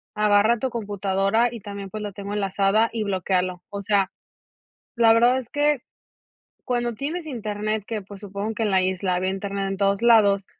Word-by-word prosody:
agarra 210 +2 +3
tu 260 - -1
computadora, 205 0 0
y 235 - -8
también, 200 -1 -7
pues, 215 +1 -6
lo 205 - -4
tengo 200 +1 -6
enlazada, 200 +2 +2
y 225 -2 -2
bloquéalo". 185 -2 -1
O 200 0 -5
sea, 200 -2 +1 0.8
la 230 -1 +6
verdad 240 +3 +4
es 245 -3 -6
que 290 -1 +1 0.9
cuando 240 -1 -1
tienes 315 +8 -4
internet, 215 -4 -3
que, 220 -3 -4
pues, 195 0 -12
supongo 205 +1 -4
que 225 - -1
en 210 - 0
la 190 -1 +3
isla 185 0 0
había 185 +1 0
internet 195 0 -3
en 195 - -2
todos 200 +1 +1
lados, 205 -4 +5
205 Hz, 180 wpm, -24 LUFS, 195-230 Hz, 0.9 s, la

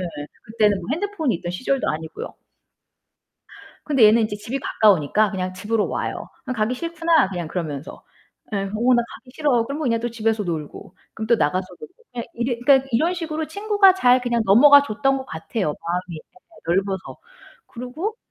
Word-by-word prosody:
네. 185 - -3 0.4
그때는 215 -2 +1
뭐 170 - -9
핸드폰이 335 - -1
있던 175 +1 -6
시절도 260 +8 -1
아니고요. 160 +1 -6 1.5
근데 270 -7 +4
얘는 220 +2 +6
이제 215 -1 -2
집이 225 +6 -5
가까우니까 210 - +3
그냥 185 -1 -3
집으로 210 +3 -1
와요. - - -4 0.2
그냥 255 - -4
"가기 220 +3 0
싫구나." 330 - +1
그냥 175 -4 -4
그러면서. 155 -5 -5 0.5
예 - - 0
"어, 195 0 -2 0.3
나 240 - +3
가기 250 - -14
싫어." 260 -7 +2
그러면 290 +4 -4
그냥 230 -3 +1
또 240 +1 -3
집에서 225 -1 -1
놀고, 160 -4 -6 0.2
그럼 220 - -5
또 235 +1 +4
나가서 185 +2 0
놀고. 365 - -11 0.2
그냥 240 -1 -4
이 235 - -2 0.2
그니까 270 0 +5
이런 320 +10 +2
식으로 320 -2 -4
친구가 405 +2 +3
잘 255 -8 +4
그냥 240 -2 0
넘어가 280 +9 +7
줬던 270 +2 0
것 265 - -7
같아요, 160 +4 -4
마음이 175 0 -4
예 - - -8 0.5
넓어서. 190 +2 -1 0.5
그리고 310 - -5
230 Hz, 370 characters per minute, -22 LUFS, 190-280 Hz, 1.5 s, 넘어가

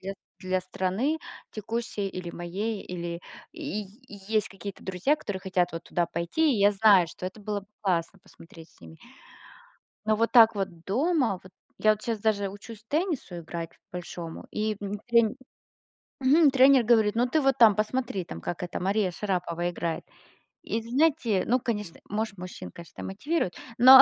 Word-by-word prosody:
для 195 +1 -4 0.3
для 185 0 -1
страны 190 - -1 0.3
текущей 220 -1 -3
или 185 -2 -6
моей, 195 +6 -3
или 170 -1 -5 0.3
и 295 -10 -4
и 210 +2 -14
есть 215 -2 +2
какие-то 195 +1 -8
друзья, 190 - +1
которые 205 -11 -5
хотят 185 -2 0
вот 165 0 -6
туда 175 -1 0
пойти. 290 - +1
И - - -1
я 200 +1 +5
знаю, 195 -3 +6
что 180 - -6
это 190 +4 -8
было 205 0 -3
бы 195 - -20
классно 185 -1 0
посмотреть 165 0 -15
с - - -25
ними. 80 -1 -13 1.1
Но 215 0 +2
вот 230 +1 +1
так 225 -2 +8
вот 185 -5 -4
дома, 255 - +1
вот, 185 - -15 0.3
я 215 - +4
вот 215 0 -6
щас 230 -2 -2
даже 205 -2 +1
учусь 205 +2 -11
теннису 305 - -1
играть 170 0 -6 0.2
большому, 175 -2 -7
и 215 0 -1
м 205 0 -4
тре 235 -2 +4 0.9
Мгм, 285 +3 +6
тренер 265 -1 +6
говорит: 220 -2 +4
"Ну 240 +2 +3
ты, 315 - +3
вот, 270 -3 +2
там 225 -5 +7
посмотри, 215 -3 -1
там 80 - -8
как, 175 - -4
эта, 180 0 -4
Мария 195 +1 +1
Шарапова 175 -2 -2
играет". 170 -2 -3 0.6
И 225 - -2
знаете, 245 - +2
ну, 250 +3 +3
конечно, 210 -8 -4
может, 210 -1 -2
мужчин, 180 +1 -8
конечно, 170 0 -10
мотивирует, 210 - -1 0.2
но, 260 +2 +11
205 Hz, 170 wpm, -27 LUFS, 180-235 Hz, 1.1 s, но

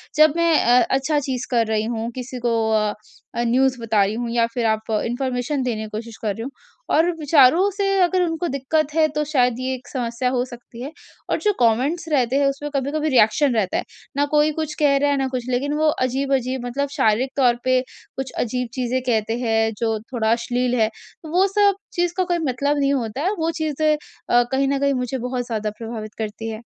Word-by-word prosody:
जब 310 -1 +6
मैं 335 0 +3
अ, 245 +1 +6
अच्छा 295 +3 +1
चीज़ 260 -3 -3
कर 230 -2 +3
रही 215 -1 0
हूँ, 230 0 -3
किसी 250 0 -6
को 235 - +2 0.2
अ 215 -1 +2 0.4
अ, 235 - 0
न्यूज़ 255 +1 +2
बता 220 -3 +2
रही 200 +2 -1
हूँ 240 0 -3
या 235 -1 +3
फ़िर 240 -2 -1
आप 220 0 -1
इन्फॉर्मेशन 255 +2 -2
देने 220 -3 -2
की 215 - -7
कोशिश 225 +1 -7
कर 210 -2 0
रही 225 - -7
हूँ। 275 - -6 0.4
और 325 +3 +4
विचारों 305 +5 +5
से 400 +1 -1
अगर 360 +1 +3
उनको 335 +1 -1
दिक्कत 295 +1 -1
है 320 -1 +4
तो 300 - +1
शायद 250 -5 +1
ये 260 0 -2
एक 255 - -13
समस्या 245 -1 -2
हो 250 -1 0
सकती 240 -1 -12
है 280 +4 -5 0.4
और - - 0
जो 420 -1 +2
कमेंट्स 265 +9 +1
रहते 260 -2 +2
हैं 280 - +3
उसमें 275 +2 -3
कभी-कभी 295 +3 0
रिएक्शन 255 +2 +4
रहता 195 -4 0
है - - -1 0.3
ना 285 - +3
कोई 300 0 +4
कुछ 310 -1 -2
कह 285 -2 +4
रहा 285 +1 +2
है 280 - +1
ना 270 -1 0
कुछ। 255 -2 -3
लेकिन 275 +4 0
वो 310 +1 +2 0.2
अजीब-अजीब 260 -1 -1
मतलब 275 +3 -2
शारीरिक 225 +5 +2
तौर 245 -3 +4
पे 255 0 +3 0.4
कुछ 265 -1 -4
अजीब 250 +1 -1
चीज़ें 255 0 -1
कहते 225 0 +1
हैं, 225 -2 +1
जो 225 -2 -1
थोड़ा 220 -2 +1
अश्लील 245 +1 0
हैं 220 - +3 0.4
वो 370 +3 +4
सब 405 -1 +5 0.2
चीज़ 350 -1 0
का 370 - +3
कोई 350 -1 -1
मतलब 285 +3 0
नहीं 280 0 +2
होता 245 0 -2
है 385 - +2
वो 325 +1 +1
चीज़ें 310 0 +1 0.4
अ, 240 0 +5
कहीं 270 +1 +2
न 275 0 0
कहीं 280 0 +2
मुझे 250 0 -2
बहुत 250 0 -3
ज़्यादा 215 -3 -2
प्रभावित 225 -2 -6
करती 220 +1 -4
हैं। 220 +1 -7
255 Hz, 215 wpm, -22 LUFS, 235-290 Hz, 0.4 s, जब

